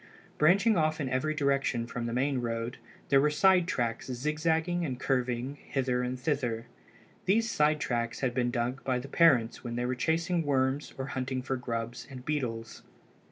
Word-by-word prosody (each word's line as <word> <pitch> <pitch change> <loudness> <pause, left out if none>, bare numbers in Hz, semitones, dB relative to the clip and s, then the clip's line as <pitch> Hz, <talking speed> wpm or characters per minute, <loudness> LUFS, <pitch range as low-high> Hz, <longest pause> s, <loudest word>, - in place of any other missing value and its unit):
Branching 195 +8 +5
off 155 0 +1
in 140 - -1
every 135 +5 0
direction 140 -4 +1
from 120 0 -4
the - - -3
main 130 +2 +1
road 115 0 -3 0.3
there 135 -1 +5
were 150 - +4
side 185 +3 +4
tracks 120 -9 -1
zigzagging 160 +6 0
and 130 -6 -3
curving 130 +1 -1
hither 130 -2 0
and 125 0 -3
thither. 125 -6 -1 0.6
These 225 +5 +2
side 150 0 +3
tracks 120 -4 -2
had 130 -3 0
been 120 -1 +1
dug 120 +2 -2
by 130 -2 0
the 125 +2 -6
parents 135 -7 +3
when 120 -1 -4
they 120 0 -1
were 125 - 0
chasing 165 +6 0
worms 135 -1 0
or 130 - -3
hunting 130 0 -2
for 130 +1 -1
grubs 120 -1 -4
and 130 -2 -9
beetles. 115 -7 -3
130 Hz, 175 wpm, -30 LUFS, 120-150 Hz, 0.6 s, Branching